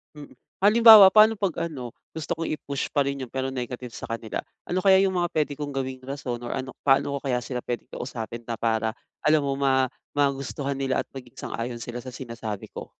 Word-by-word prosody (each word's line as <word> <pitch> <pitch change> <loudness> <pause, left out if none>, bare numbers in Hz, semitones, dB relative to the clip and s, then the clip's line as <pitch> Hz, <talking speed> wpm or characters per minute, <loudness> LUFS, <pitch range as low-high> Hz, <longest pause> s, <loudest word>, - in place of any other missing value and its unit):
Hmm. 150 -1 -10 0.3
Halimbawa 215 -1 +10
paano 215 +2 +7
'pag 195 -6 -1
ano, 130 -7 -7 0.3
gusto 160 0 -3
kong 165 - -3
i-push 140 -2 -4
pa 145 - +3
rin 140 -1 -3
yun 120 - -19
pero 135 0 -1
negative 125 -1 -5
sa - - -7
kanila? 115 -1 -4 0.2
Ano 180 - -3
kaya 190 0 +5
yung 190 -1 +1
mga 175 - +1
pwede 150 -2 +1
kong 145 -1 -4
gawing 130 -1 -3
rason 135 -3 -4
or 120 0 -5
ano, 130 -1 -4 0.2
paano 140 +1 +3
ko - - -5
kaya 125 -2 0
sila 125 0 -4
pwedeng 120 - -4
kausapin 115 -2 -6
na 120 - -2
para 110 -1 0 0.3
alam 155 0 +5
mo 140 -1 -1
ma 130 -2 +2 0.3
magustuhan 140 -1 -1
nila 135 -1 0
at - - -41
maging 125 -3 -11
sang-ayon 120 0 -5
sila 120 +1 -6
sa 130 +1 -9
sinasabi 115 -5 -6
ko? - - -7
135 Hz, 210 wpm, -25 LUFS, 120-150 Hz, 0.3 s, Halimbawa